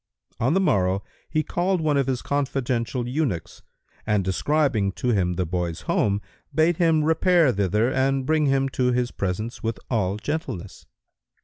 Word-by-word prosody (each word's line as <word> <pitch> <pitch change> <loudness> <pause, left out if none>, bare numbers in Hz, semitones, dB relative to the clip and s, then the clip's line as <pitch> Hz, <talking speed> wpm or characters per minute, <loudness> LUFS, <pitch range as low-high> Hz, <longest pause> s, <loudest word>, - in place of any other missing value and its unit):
On 130 +8 +2
the - - +4
morrow, 95 - +1 0.3
he 155 0 +1
called 180 +3 0
one 155 -2 +1
of 135 -2 +1
his 130 -2 -1
confidential 130 -3 -1
eunuchs 125 - -2 0.4
and, 105 -2 +1
describing 110 +1 +1
to 125 - -2
him 95 -6 +1
the 90 +1 -1
boy's 85 -1 -3
home, 100 0 +1 0.3
bade 160 +1 +3
him 165 -3 +3
repair 160 -1 +4
thither 105 +4 +1
and 135 0 +1
bring 155 0 +2
him 135 0 +2
to 125 -1 +1
his 125 0 0
presence 100 +5 -3
with 115 0 -2
all 100 -4 0
gentleness. 130 - -5
125 Hz, 155 wpm, -24 LUFS, 100-150 Hz, 0.4 s, the